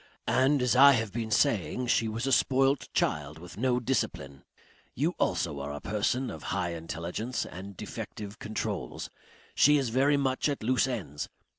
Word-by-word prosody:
And 135 +1 +3
as 125 0 +2
I 140 +2 +9
have 110 -4 -1
been 115 -1 -3
saying 110 +3 +1
she 115 -1 +2
was 115 +3 -3
a 135 - 0
spoilt 135 0 +2
child, 75 +1 -1
with 90 +2 -11
no 125 +2 +1
discipline.... 70 - -2 0.5
You - - 0
also 70 - 0
are 70 +1 -4
a 75 - -5
person 120 - -1
of - - -8
high 90 -3 -1
intelligence 85 +9 -4
and 95 +1 -9
defective 105 +1 -7
controls. 110 +1 -4 0.4
She 150 +1 +5
is 135 -4 0
very 135 +5 +3
much 135 +1 0
at 140 -6 -3
loose 130 +3 +2
ends. 90 - -4
115 Hz, 165 wpm, -29 LUFS, 90-130 Hz, 0.5 s, I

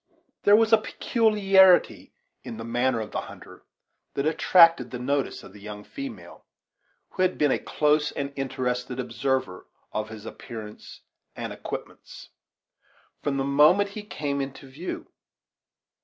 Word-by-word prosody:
There 205 - +7
was 225 +1 +3
a 220 - +8
peculiarity 195 -5 +3 0.3
in 115 - -7
the 115 - -6
manner 120 +1 0
of 105 - -7
the - - -2
hunter - - -13 0.5
that 140 - -1
attracted 165 -3 +5
the 125 - -5
notice 140 +3 -2
of - - -13
the 105 - -14
young 105 0 -8
female, 275 - -9 0.7
who 185 - -5
had 185 0 +2
been 145 -2 +3
a - - +1
close 150 0 +1
and 140 0 -4
interested 130 -2 -3
observer 130 -5 -2 0.2
of 110 0 -3
his 110 -2 -10
appearance 110 -3 -9 0.3
and - - -5
equipments, - - -8 0.9
from 140 -2 -1
the 135 - 0
moment 150 +9 +4
he 215 - -6
came 145 -9 -3
into 135 0 -7
view. 150 +8 -6
140 Hz, 140 wpm, -26 LUFS, 125-180 Hz, 0.9 s, a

